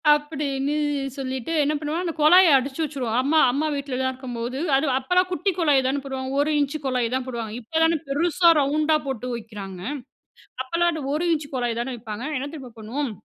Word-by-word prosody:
அப்படின்னு 290 Hz, -1 st, -2 dB, 0.4 s
சொல்லிட்டு 260 Hz, +1 st, -4 dB
என்ன 295 Hz, +2 st, +1 dB
பண்ணுவோம் 310 Hz, +3 st, -2 dB
அந்த 335 Hz, -, -2 dB
குழாய 325 Hz, +1 st, +7 dB
அடச்சு 265 Hz, +3 st, -4 dB
வச்சுருவோம். 255 Hz, -6 st, -2 dB
அம்மா 305 Hz, +4 st, +3 dB
அம்மா 300 Hz, +4 st, 0 dB
வீட்டிலலாம் 260 Hz, -2 st, -2 dB
இருக்கும்போது 250 Hz, 0 st, -5 dB, 0.2 s
அது 275 Hz, +3 st, +2 dB
அப்போலாம் 360 Hz, +7 st, +1 dB
குட்டி 380 Hz, +2 st, 0 dB
குழாய் 285 Hz, -5 st, +3 dB
தானே 275 Hz, +1 st, 0 dB
போடுவாங்க 265 Hz, 0 st, -4 dB
1 305 Hz, +2 st, +1 dB
இஞ்ச் 285 Hz, +1 st, 0 dB
குழாய் 250 Hz, -3 st, 0 dB
தான் 260 Hz, -, -2 dB
போடுவாங்க. 230 Hz, -3 st, -5 dB
இப்போதானே 325 Hz, +6 st, +2 dB
பெருசா, 335 Hz, +4 st, +3 dB
ரவுண்டா 305 Hz, +2 st, +2 dB
போட்டு 250 Hz, -1 st, -3 dB
வைக்குறாங்க. 205 Hz, -5 st, -8 dB, 0.8 s
அப்போலாம் 340 Hz, +6 st, +1 dB
அந்த 315 Hz, -2 st, -4 dB
1 340 Hz, +3 st, 0 dB
இஞ்ச் 300 Hz, -2 st, -1 dB
குழாய் 240 Hz, -2 st, -1 dB
தானே 255 Hz, +1 st, -3 dB
வைப்பாங்க. 225 Hz, +3 st, -6 dB
என்ன 280 Hz, +2 st, -4 dB
தெரியுமா 260 Hz, -5 st, -9 dB
பண்ணுவோம்! 240 Hz, +5 st, -3 dB
275 Hz, 170 wpm, -24 LUFS, 250-310 Hz, 0.8 s, குழாய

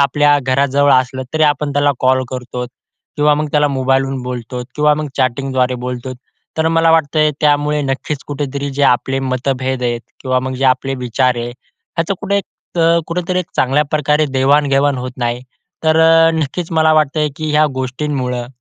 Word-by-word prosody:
आपल्या 145 Hz, +2 st, +3 dB
घराजवळ 140 Hz, +2 st, +2 dB
असलं 130 Hz, +1 st, -5 dB
तरी 155 Hz, -, +2 dB
आपण 145 Hz, 0 st, +1 dB
त्याला 145 Hz, +1 st, +2 dB
कॉल 130 Hz, 0 st, +3 dB
करतो 125 Hz, -1 st, -5 dB, 0.5 s
किंवा 150 Hz, 0 st, +3 dB
मग 150 Hz, +1 st, -1 dB
त्याला 150 Hz, -1 st, +3 dB
मोबाईलहून 135 Hz, 0 st, 0 dB
बोलतोत 125 Hz, 0 st, -5 dB
किंवा 150 Hz, 0 st, +4 dB
मग 155 Hz, 0 st, -3 dB
चॅटिंगद्वारे 130 Hz, 0 st, 0 dB
बोलतोत. 125 Hz, +1 st, -5 dB, 0.4 s
तर 160 Hz, 0 st, +2 dB
मला 165 Hz, 0 st, +3 dB
वाटतंय 155 Hz, -1 st, +3 dB
त्यामुळे 150 Hz, 0 st, +2 dB
नक्कीच 135 Hz, +1 st, -3 dB
कुठेतरी 140 Hz, -1 st, -4 dB
जे 140 Hz, +1 st, -2 dB
आपले 135 Hz, +1 st, +2 dB
मतभेद 130 Hz, 0 st, -2 dB
आहेत 120 Hz, -1 st, -1 dB, 0.2 s
किंवा 130 Hz, -1 st, 0 dB
मग 130 Hz, 0 st, -4 dB
जे -, -, +1 dB
आपले 135 Hz, +1 st, +2 dB
विचार 125 Hz, 0 st, 0 dB
आहे 120 Hz, 0 st, -3 dB
ह्याचं 165 Hz, +8 st, -6 dB
कुठे 200 Hz, -1 st, 0 dB, 0.4 s
त -, -, -2 dB, 0.3 s
कुठेतरी 180 Hz, +1 st, -2 dB
एक 180 Hz, -, -3 dB
चांगल्या 135 Hz, +4 st, +2 dB
प्रकारे 150 Hz, 0 st, +1 dB
देवाण-घेवाण 140 Hz, +1 st, +3 dB
होत 125 Hz, 0 st, -5 dB
नाही. 120 Hz, -1 st, -2 dB, 0.4 s
तर 160 Hz, 0 st, +3 dB, 0.4 s
नक्कीच 160 Hz, +2 st, -3 dB
मला 160 Hz, 0 st, +4 dB
वाटतंय 155 Hz, 0 st, +2 dB
की 155 Hz, -1 st, -3 dB
ह्या 150 Hz, +1 st, +4 dB
गोष्टींमुळं 130 Hz, -2 st, -3 dB
140 Hz, 160 wpm, -16 LUFS, 130-150 Hz, 0.5 s, किंवा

